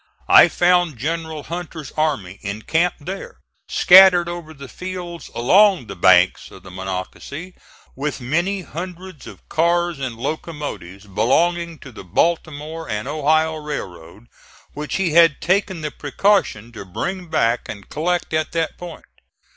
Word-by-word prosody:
I - - +9
found 175 -5 +2
General 160 +3 -4
Hunter's 165 -3 -7
army 140 - -2
encamped 145 - -1
there, 190 +2 -7 0.3
scattered 180 -2 +7
over 170 -2 -6
the 140 -3 -11
fields 180 +1 -7
along 185 - +4
the 100 - -8
banks 90 +1 +4
of 95 - -14
the 95 - -12
Monocacy, 95 - -6 0.4
with 145 +2 -3
many 170 +10 -1
hundreds 180 -1 -8
of - - -13
cars 170 -1 +1
and 130 -4 -4
locomotives, 145 - -6
belonging 165 - +1
to 130 - -10
the 110 - -11
Baltimore 155 - -2
and 105 -1 -3
Ohio 155 +1 +1
Railroad, 100 - -7 0.5
which 150 0 -5
he 190 -4 0
had 165 -2 +5
taken 190 -1 0
the 150 -1 -4
precaution 145 - 0
to 110 -4 -9
bring 175 - -5
back 115 -6 0
and 100 -2 -8
collect 175 +2 -2
at 155 0 -1
that 165 -1 -2
point. 175 -2 -9
155 Hz, 140 wpm, -20 LUFS, 120-175 Hz, 0.5 s, I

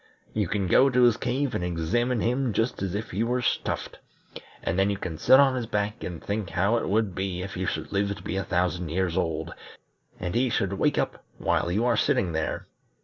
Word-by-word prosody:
You 105 -3 0
can 100 +2 -1
go 130 +9 +5
to 125 -1 +3
his 120 -2 +6
cave 130 +2 -1
and - - -1
examine 105 +8 0
him 125 0 0
just 115 0 0
as 95 -1 -2
if 105 - -4
he 95 - -2
were 125 +1 0
stuffed, - - -2 0.6
and 90 - 0
then 95 +1 +3
you 100 - -1
can 85 -5 -5
sit 130 - +7
on 135 -2 +5
his 120 -3 -3
back 105 0 -2
and 85 -3 -5
think 100 -3 -2
how 100 +7 +2
it - - -2
would 105 -1 +1
be 95 -1 -3
if 100 - -6
you 95 0 -2
should 80 - -3
live 100 0 0
to - - -12
be - - -3
a 95 - 0
thousand 90 -1 -1
years 90 +1 0
old, 80 -1 -1 0.7
and 90 -1 -3
he 125 +2 +2
should 100 -4 0
wake 100 - +1
up - - -1
while 85 - 0
you 110 +6 +1
are 120 -3 +2
sitting 125 - +2
there. 80 0 -2
100 Hz, 225 wpm, -26 LUFS, 90-120 Hz, 0.7 s, sit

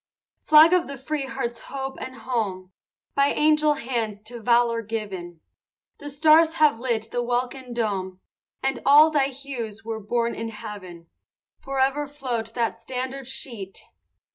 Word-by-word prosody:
V - - -36
Flag 310 +3 +8
of 360 -1 +3
the 280 0 -6
free 275 +1 -3
heart's 240 -3 -3
hope 270 -1 -6
and 260 - -6
home, 200 -8 -3 0.4
By 280 0 +3
angel 300 0 +3
hands 225 -6 -3
to 235 +1 -9
valor 235 0 +3
given; 195 -7 -6 0.6
The 290 - -6
stars 315 +3 +5
have 300 -7 +4
lit 230 -3 -2
the 245 - 0
welkin 245 +1 -2
dome, 195 -6 -2 0.4
And 270 0 0
all 300 +3 +7
thy 285 -3 +3
hues 245 -6 -7
were 225 -1 -3
born 235 +3 -1
in 225 0 -4
heaven. 205 -6 -9 0.5
Forever 275 +2 0
float 245 -6 -4
that 230 -1 -1
standard 260 +2 -5
sheet! 230 -7 -5
245 Hz, 145 wpm, -24 LUFS, 225-275 Hz, 0.6 s, Flag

